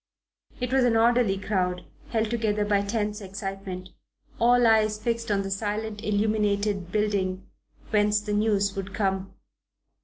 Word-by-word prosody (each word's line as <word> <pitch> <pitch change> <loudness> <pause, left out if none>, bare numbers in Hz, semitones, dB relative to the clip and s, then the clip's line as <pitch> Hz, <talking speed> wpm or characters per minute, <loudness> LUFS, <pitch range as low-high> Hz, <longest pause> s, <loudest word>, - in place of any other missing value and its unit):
It 250 0 -2
was 265 -1 +4
an 235 -2 +3
orderly 230 -3 +3
crowd, 185 -2 -1 0.2
held 220 -1 0
together 215 -3 0
by 205 -1 +2
tense 210 +1 -2
excitement: 195 -1 -6 0.5
all 245 +1 +5
eyes 215 -1 +4
fixed 230 +1 -2
on 200 -1 +1
the 195 - -5
silent 210 +1 -3
illuminated 205 -3 0
building 195 -3 0 0.5
whence 210 -1 +3
the 210 0 -4
news 205 -2 +1
would 195 0 -5
come. 195 -2 -1
210 Hz, 135 wpm, -26 LUFS, 195-220 Hz, 0.5 s, all